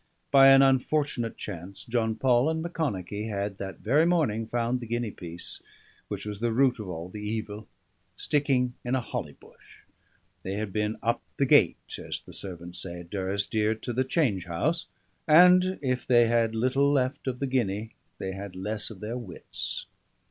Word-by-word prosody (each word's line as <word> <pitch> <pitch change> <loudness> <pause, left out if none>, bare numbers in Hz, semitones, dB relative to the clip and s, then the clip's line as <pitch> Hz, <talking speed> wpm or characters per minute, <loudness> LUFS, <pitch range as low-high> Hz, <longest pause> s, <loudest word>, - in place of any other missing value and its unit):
By 135 0 +8
an 135 0 +8
unfortunate 135 -2 +1
chance 95 -1 -7
John 115 -2 0
Paul 125 +3 +3
and 160 0 -1
Macconochie 110 - -3
had 100 -1 -3
that 95 -3 -6
very 140 +8 +3
morning 130 -11 +1
found 120 +2 0
the 120 - -7
guinea 120 -1 -2
piece 85 -2 -6 0.5
which - - -5
was 105 -1 -5
the 115 +1 0
root 125 +1 +3
of 105 -3 -6
all 85 -1 -5
the 105 +3 -8
evil 105 0 -4 0.5
sticking 135 -4 +1
in 125 +1 0
a - - +2
holly - - -5
bush; - - -20 0.6
they 95 - -4
had 105 -1 -3
been 105 0 -1
"up 115 +1 +1 0.2
the - - +3
gait," - - +5 0.2
as - - -5
the - - -14
servants 90 -2 -6
say 85 -1 -6
at 85 - -15
Durrisdeer, 100 +3 0
to 120 - -4
the 130 +3 +2
change 130 - 0
house; 155 - -1 0.4
and 180 +3 +6
if 125 -2 -1
they 120 -2 +6
had 115 -1 +2
little 130 +5 +2
left 135 0 0
of 125 -1 -1
the 140 - -2
guinea, 110 -4 -1 0.3
they 95 - -4
had 95 0 -7
less 105 +3 -2
of 105 -5 -11
their 115 +4 -4
wits. 95 -8 -5
115 Hz, 175 wpm, -27 LUFS, 100-130 Hz, 0.6 s, By